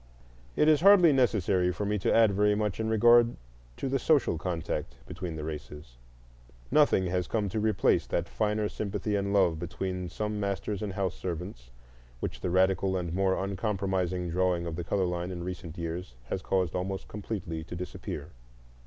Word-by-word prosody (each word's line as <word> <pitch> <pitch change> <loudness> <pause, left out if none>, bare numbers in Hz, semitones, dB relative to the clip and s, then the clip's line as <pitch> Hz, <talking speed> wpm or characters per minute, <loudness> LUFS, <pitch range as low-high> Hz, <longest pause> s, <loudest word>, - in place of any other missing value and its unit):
It 150 - +3
is 155 -1 +5
hardly 185 -5 +7
necessary 100 -8 +2
for 95 +4 -3
me 105 +1 0
to - - +1
add 115 -2 +5
very 105 +1 +3
much 105 -1 -1
in 110 0 -1
regard 120 +2 +5 0.4
to - - -3
the 135 +1 0
social 145 - +3
contact 85 -8 -3
between 85 -3 -6
the 75 - -5
races. 75 -4 -8 0.7
Nothing 145 -9 +4
has 90 -1 -1
come 105 -3 -1
to 110 - -2
replace 105 -2 +2
that - - -1
finer 105 - 0
sympathy 105 0 -3
and 100 0 -1
love 90 -6 +3
between 90 0 -4
some 105 +3 -3
masters 100 0 -2
and 105 -3 -3
house 95 -2 -1
servants 85 -8 -6 0.5
which - - -5
the - - -1
radical 95 +1 +2
and 85 -2 -3
more 95 0 +2
uncompromising 95 -3 -1
drawing 90 -1 +1
of 85 -2 -4
the 85 - -4
color 95 +2 0
line 90 0 -2
in 90 -2 -5
recent 90 -2 -6
years 85 -5 -5
has 95 - -2
caused 90 -4 0
almost 95 +1 -3
completely 95 -6 -5
to 90 - -7
disappear. 85 -3 -6
95 Hz, 175 wpm, -29 LUFS, 85-105 Hz, 0.7 s, hardly